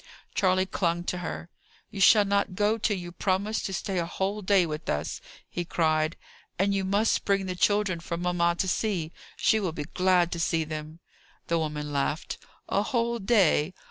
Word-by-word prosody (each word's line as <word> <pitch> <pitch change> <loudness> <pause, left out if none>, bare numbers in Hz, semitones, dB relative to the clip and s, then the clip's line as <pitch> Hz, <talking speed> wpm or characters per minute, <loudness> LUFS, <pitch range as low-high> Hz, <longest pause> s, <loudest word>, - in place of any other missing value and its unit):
Charley 185 -1 +2
clung 175 -2 -1
to 180 0 -3
her. 175 0 -6 0.4
"You 195 - -5
shall 205 +2 +7
not 200 -1 0
go 210 +3 +1
till 210 -2 +1
you 175 -1 -7
promise 200 +4 -1
to - - -4
stay 190 0 -2
a 170 - 0
whole 195 +4 -2
day 195 -2 +4
with 155 0 -5
us!" 75 +2 -2 0.3
he 175 - -4
cried. 155 -2 +1 0.4
"And 200 +2 +2
you 195 -1 0
must 200 +4 +1
bring 195 -1 +1
the 185 - -2
children 205 -1 +1
for 170 0 -4
mamma 175 -1 +1
to 190 - 0
see. 180 -4 -1 0.3
She 220 - +3
will 185 -6 -2
be 150 - -4
glad 180 +1 +2
to 170 - -3
see 165 0 +1
them." 155 +1 -7 0.5
The 170 0 +2
woman 150 -2 -3
laughed. 145 +2 -2 0.3
"A 200 - +1
whole 235 +1 0
day! 190 -6 +3
180 Hz, 185 wpm, -27 LUFS, 165-200 Hz, 0.5 s, shall